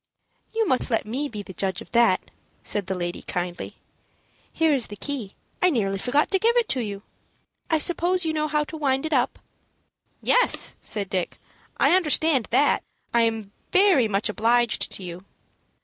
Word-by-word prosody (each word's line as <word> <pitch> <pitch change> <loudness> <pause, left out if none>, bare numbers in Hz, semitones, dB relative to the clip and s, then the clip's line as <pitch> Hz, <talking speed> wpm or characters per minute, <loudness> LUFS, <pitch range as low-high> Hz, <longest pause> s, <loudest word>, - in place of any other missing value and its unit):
"You 450 -1 0
must 260 -2 +2
let 225 - 0
me 265 +7 -3
be 210 -4 -6
the 190 - -10
judge 190 +1 -2
of - - -12
that," 235 -6 +3 0.3
said 205 -3 -1
the 190 - -2
lady, 175 -1 -4
kindly. 175 0 -4 0.8
"Here 320 -2 +2
is 260 -4 +1
the 205 - -8
key; 230 -3 -5 0.3
I 365 - +5
nearly 195 - 0
forgot 275 +8 +1
to 385 - +3
give 465 +4 +3
it 475 -2 +2
to 265 - 0
you. 205 -3 -4 0.7
I 320 - +3
suppose 350 +3 +1
you 320 - 0
know 305 0 0
how 300 0 +1
to 320 +2 -8
wind 270 -1 0
it 315 - -2
up?" 250 -3 +1 0.8
"Yes," - - +2
said 205 -2 -2
Dick. 185 -2 -3 0.4
"I - - +4
understand 310 - +2
that. 275 +4 +3 0.3
I 235 - +4
am 225 -3 -1 0.2
very 370 - +5
much 200 0 0
obliged 230 +2 +1
to 195 - -3
you." 175 +1 -7
245 Hz, 180 wpm, -24 LUFS, 205-315 Hz, 0.8 s, I